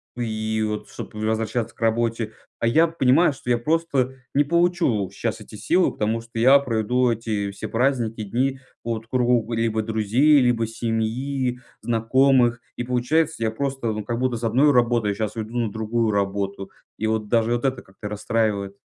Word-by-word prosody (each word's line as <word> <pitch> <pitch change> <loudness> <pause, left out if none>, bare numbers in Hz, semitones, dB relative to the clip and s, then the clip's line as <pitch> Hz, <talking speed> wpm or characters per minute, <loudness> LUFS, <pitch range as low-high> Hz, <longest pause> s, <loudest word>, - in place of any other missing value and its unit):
И 110 -2 -2
вот, 105 0 -3
чтоб - - -8
возвращаться 110 +2 -2
к - - -24
работе. 115 -1 0 0.3
А 115 - +1
я 160 +8 +5
понимаю, 155 0 +3
что 125 - -9
я 120 - +3
просто 140 -2 0 0.2
не 145 - +5
получу 170 - +1
щас 110 +1 -3
эти 110 - -12
силы, 175 - +2
потому 110 +2 -1
что 115 0 -11
я 130 +5 +6
проведу 125 0 +1
эти 105 -3 -2
все 100 +2 -6
праздники, 115 -2 0
дни 130 +6 -1 0.2
вот 115 -1 -3
в - - -34
кругу 120 -2 +1
либо 115 -1 0
друзей, 110 +7 +3
либо 120 -3 +2
семьи, 120 +3 -2 0.2
знакомых. 120 +1 +3
И 120 - -3
получается 125 +4 0
я 110 - +1
просто 135 -1 -2
вот 105 -1 -4
как 120 0 -2
будто 125 -2 0
с 115 - -9
одной 130 +6 +4
работой, 120 -5 +2
щас 110 +1 -3
иду 115 +2 -5
на 115 -4 0
другую 110 +1 -1
работу 100 -1 -2 0.3
и 110 - 0
вот 110 -1 -1
даже 115 +1 +2
вот 120 - -3
это 130 -2 0
как-то 95 +2 -10
расстраивает. 105 -1 -1
115 Hz, 175 wpm, -23 LUFS, 110-130 Hz, 0.3 s, я